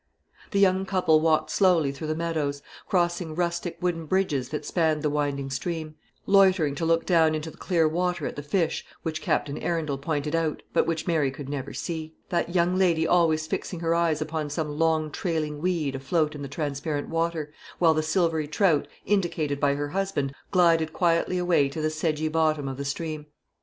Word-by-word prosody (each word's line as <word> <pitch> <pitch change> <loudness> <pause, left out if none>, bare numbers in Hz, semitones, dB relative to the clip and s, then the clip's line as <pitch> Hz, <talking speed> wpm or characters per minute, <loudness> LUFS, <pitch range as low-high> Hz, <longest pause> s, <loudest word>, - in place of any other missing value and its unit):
The 200 - -1
young 190 -1 +3
couple 180 -5 +3
walked 155 -1 +2
slowly 175 -7 +3
through 145 +3 -6
the 155 - -1
meadows, 155 -4 -2 0.2
crossing 175 -3 0
rustic 170 0 -2
wooden 165 -3 -1
bridges 150 -8 0
that 150 -1 -4
spanned 160 -2 +1
the 150 - +1
winding 140 -2 -1
stream, 155 +3 -3 0.3
loitering 190 -7 +4
to 160 +3 -2
look 165 0 +2
down 160 -3 +4
into 155 +1 -4
the - - -18
clear 170 -4 +2
water 180 +3 -1
at - - -4
the 145 - -5
fish 165 +3 0 0.2
which 160 -1 -3
Captain 145 0 -1
Arundel 155 -5 -2
pointed 150 +1 -2
out, 165 -2 -1
but - - +2
which 165 -1 -1
Mary 160 -6 +2
could 135 +1 -8
never 140 -1 -4
see; 160 -1 -5
that 175 0 -1
young 175 +1 +3
lady 170 -4 +3
always 160 -3 +3
fixing 165 +2 -4
her 165 0 +1
eyes 165 -2 +1
upon 155 -1 -3
some 150 +1 -2
long 160 -2 +2
trailing 155 -3 -2
weed 165 -6 0
afloat 150 +3 0
in 145 - -8
the 140 - -4
transparent 145 +1 -3
water, 165 -2 -2 0.2
while 165 -2 +5
the 155 - +1
silvery 160 -1 +1
trout 155 -1 +2 0.2
indicated 165 -8 0
by 140 -1 +2
her 145 0 -3
husband 185 -7 -1 0.2
glided 165 -4 +3
quietly 175 +1 +1
away 175 -6 +2
to 140 - -6
the 155 0 0
sedgy 155 0 -1
bottom 155 -2 +1
of 135 -1 -4
the 140 - -4
stream. 155 +1 -4
160 Hz, 190 wpm, -26 LUFS, 150-170 Hz, 0.3 s, while